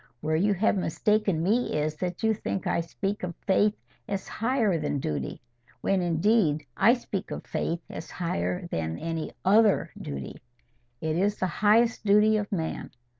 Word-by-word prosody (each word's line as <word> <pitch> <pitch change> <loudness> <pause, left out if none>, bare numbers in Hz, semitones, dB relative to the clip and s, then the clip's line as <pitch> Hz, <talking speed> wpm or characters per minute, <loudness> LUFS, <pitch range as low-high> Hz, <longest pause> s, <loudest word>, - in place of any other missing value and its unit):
Where 155 +3 0
you 200 +5 +2
have 205 +4 +2
mistaken 195 -1 +1
me 220 0 +1
is, 150 +1 -1
that 180 +3 -4
you 220 0 +4
think 195 -2 -3
I - - +1
speak 195 +5 -3
of 175 -2 -4
faith 205 +1 +3 0.3
as 200 -2 -3
higher 225 -7 +1
than 150 -1 -1
duty, 75 - -3 0.4
when 195 -1 +1
indeed 170 -2 +2
I 225 +5 +5
speak 205 -5 -5
of - - -6
faith 170 +1 -2
as - - -8
higher 180 +1 -2
than 80 0 -2
any 165 -1 -3
OTHER 210 +1 +4
duty. 70 -1 -6 0.6
It 160 0 -1
is 205 +3 +1
the - - 0
highest 215 +7 +3
duty 210 +1 +5
of 205 -1 -3
man. 165 -5 -3
190 Hz, 165 wpm, -27 LUFS, 165-210 Hz, 0.6 s, I